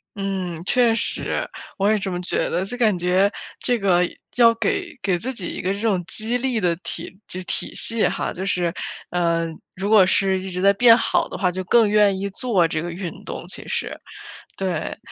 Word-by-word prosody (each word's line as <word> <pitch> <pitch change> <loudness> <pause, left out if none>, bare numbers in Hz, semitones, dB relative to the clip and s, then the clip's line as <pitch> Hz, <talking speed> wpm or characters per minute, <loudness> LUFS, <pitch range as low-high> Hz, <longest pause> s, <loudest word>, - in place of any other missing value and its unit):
嗯， 190 -4 -3
确 240 +1 +3
实， - - 0 0.3
我 200 +1 +2
也 215 - +3
这 195 -1 -3
么 175 - -3
觉 180 - 0
得， 180 +3 -1
就 220 - -3
感 220 -6 +3
觉 180 +3 +2 0.3
这 245 - +1
个 195 -4 +3 0.4
要 235 -2 +7
给 350 - -2
给 185 -3 +1
自 255 +9 -3
己 195 -9 -4
一 - - -5
个 185 - -1
这 200 - -5
种 200 -6 +1
激 225 +4 -1
励 250 -2 0
的 175 -4 +1
体 190 +1 -6
就 185 - -5
体 - - -2
系 230 -1 +2
哈， - - -2
就 185 - -5
是 180 -3 0 0.4
呃， 170 -1 +1 0.3
如 195 +2 -3
果 215 -3 +8
是 190 0 +2
一 190 - -6
直 180 0 -4
在 200 +2 +5
变 230 +3 +7
好 - - +1
的 - - -6
话， 180 -1 +1
就 185 +1 -4
更 230 +3 +5
愿 205 -2 +3
意 200 - -2
做 195 -5 +1
这 155 -1 -2
个 175 +1 -4
运 175 0 -7
动， - - -6
其 - - -10
实。 - - -3 0.6
对， 185 -5 -3
195 Hz, 220 characters per minute, -22 LUFS, 180-220 Hz, 0.6 s, 果